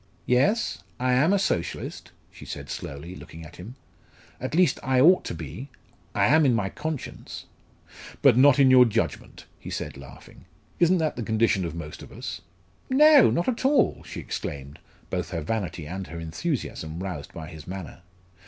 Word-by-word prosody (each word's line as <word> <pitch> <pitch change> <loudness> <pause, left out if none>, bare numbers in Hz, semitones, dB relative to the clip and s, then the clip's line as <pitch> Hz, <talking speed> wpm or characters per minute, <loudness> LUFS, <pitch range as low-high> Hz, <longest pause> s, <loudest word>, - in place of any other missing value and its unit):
"Yes, 140 - +2 0.2
I 125 0 +2
am 145 +8 +4
a 200 - +4
Socialist," 90 - -3 0.2
she - - -13
said - - -7
slowly, 75 +6 -7
looking 80 -3 -11
at 75 - -13
him. 105 +8 -9 0.6
"At 130 +4 -4
least 180 0 +3
I 130 -1 +1
ought 175 +8 +6
to - - -4
be 80 - -8 0.5
I - - +3
am 155 +1 +5
in 130 -4 +4
my 100 -4 0
conscience." 155 +4 -6 0.8
"But - - +7
not 130 +1 +6
in 135 -2 +6
your 125 -1 +8
judgment?" 115 - -3
he - - -9
said - - -5
laughing. 70 +4 -14 0.3
"Isn't 175 +2 +4
that 160 -3 -1
the - - -3
condition 110 -4 +1
of 85 -1 -5
most 75 -3 -7
of - - -12
us?" - - -6 0.5
"No, 290 0 +7
not 170 - 0
at 250 -1 -1
all!" 275 +2 +3
she - - -8
exclaimed, 70 0 -6 0.3
both 90 -2 -2
her 85 -3 -3
vanity 90 -2 -3
and 95 +4 -6
her 85 +1 -7
enthusiasm 80 - -4
roused 85 -7 -6
by 80 -2 -8
his 80 -1 -11
manner. 90 -2 -7
110 Hz, 175 wpm, -26 LUFS, -, 0.8 s, your